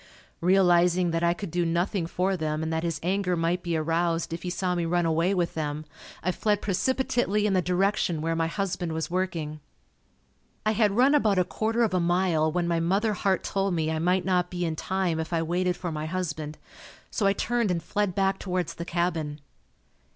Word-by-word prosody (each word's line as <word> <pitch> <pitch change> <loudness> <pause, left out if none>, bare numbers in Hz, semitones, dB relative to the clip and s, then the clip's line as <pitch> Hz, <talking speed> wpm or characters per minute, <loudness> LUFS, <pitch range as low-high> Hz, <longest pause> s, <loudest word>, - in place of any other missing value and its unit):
Realizing 180 -1 +4
that 165 0 0
I 170 0 +3
could 195 -2 -6
do 175 +1 +1
nothing 170 +2 0
for 185 +3 0
them 155 -2 -2
and 160 0 -2
that 160 - 0
his 165 -1 -2
anger 185 0 +1
might 170 +2 0
be 170 -2 -1
aroused 165 +1 0
if 165 - -5
he 180 - -4
saw 180 +1 -1
me 175 -1 -1
run 175 +1 +1
away 165 +3 +2
with 175 -2 0
them, 155 -1 -3 0.4
I 185 - +1
fled 205 +2 0
precipitately 210 0 0
in 205 - +2
the 185 - +3
direction 180 -1 +1
where 165 +1 -1
my 165 0 +1
husband 175 -2 -2
was 160 +1 -3
working. 170 -5 -2 1.1
I 215 - +3
had 215 -2 +2
run 265 +4 +5
about 215 -9 +3
a 180 - +4
quarter 225 +5 0
of 220 - +1
a 185 - +2
mile 170 -2 +2
when 175 +1 0
my 170 -1 +1
mother 195 +6 +1
heart 190 -1 0
told 195 -2 0
me 160 -1 0
I 160 - -1
might 180 +3 +1
not 180 -2 +1
be 175 -1 -2
in 160 -1 -2
time 185 -1 -1
if 160 +1 -4
I 165 -1 +1
waited 180 +2 0
for 175 -2 -4
my 155 0 -3
husband, 160 -4 -4 0.5
so 205 - +1
I 195 - +4
turned 235 +1 0
and 170 -2 -1
fled 205 0 -1
back 195 0 +1
towards 180 -3 -2
the 170 - -6
cabin. 165 -4 -1
175 Hz, 210 wpm, -27 LUFS, 165-195 Hz, 1.1 s, run